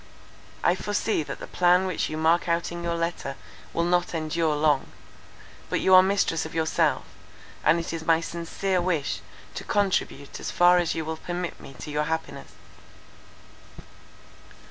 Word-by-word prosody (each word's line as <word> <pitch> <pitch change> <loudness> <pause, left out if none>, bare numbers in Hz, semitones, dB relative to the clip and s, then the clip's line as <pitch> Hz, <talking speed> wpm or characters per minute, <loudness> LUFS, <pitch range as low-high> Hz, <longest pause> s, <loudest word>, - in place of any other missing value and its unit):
I 175 - +4
foresee 205 +1 -1
that 150 - -6
the - - -6
plan 180 +1 +3
which 185 -4 -1
you 155 - -4
mark 165 +2 +2
out 170 0 0
in 170 0 -5
your 170 0 -1
letter 165 -5 -3 0.4
will 170 - 0
not 175 0 +1
endure 160 0 0
long; 150 -2 +2 0.8
but - - 0
you 190 - +3
are 185 - +10
mistress 190 -4 +1
of 160 - -8
yourself, 160 -1 +1 0.6
and 165 +2 +4
it 170 - -4
is 165 -1 -4
my 165 0 +4
sincere 170 +3 -2
wish 170 -5 -1 0.3
to - - -6
contribute 190 -8 -1
as - - -4
far 175 0 +5
as 175 -2 0
you 160 - -3
will 160 0 -4
permit 175 +1 -4
me 135 - -12
to 150 - -7
your 150 +1 0
happiness." 160 +1 -4
170 Hz, 165 wpm, -26 LUFS, 160-180 Hz, 0.8 s, are